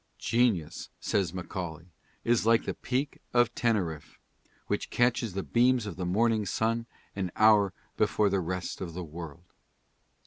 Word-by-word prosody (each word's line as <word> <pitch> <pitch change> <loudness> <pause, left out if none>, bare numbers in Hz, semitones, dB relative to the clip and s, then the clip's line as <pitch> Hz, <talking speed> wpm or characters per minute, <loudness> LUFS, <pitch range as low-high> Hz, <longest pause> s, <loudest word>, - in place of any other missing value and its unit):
"Genius," 115 -9 0
says 95 -5 0
Macaulay, 85 -3 -5 0.4
"is 120 0 +2
like 115 +1 +4
the - - -2
peak 135 +3 -2 0.2
of 120 -1 +4
Teneriffe, 90 -11 -1 0.5
which - - -2
catches 120 -4 +1
the 95 - -2
beams 125 -1 +3
of 100 -5 -5
the 90 -1 -3
morning 110 +3 +2
sun 115 +4 -1 0.3
an 95 -3 -2
hour 105 -3 +5 0.3
before 105 0 +2
the 100 -1 +1
rest 90 +2 -4
of 85 -3 -5
the 90 - -4
world." 85 +1 -9
100 Hz, 145 wpm, -29 LUFS, 90-115 Hz, 0.5 s, hour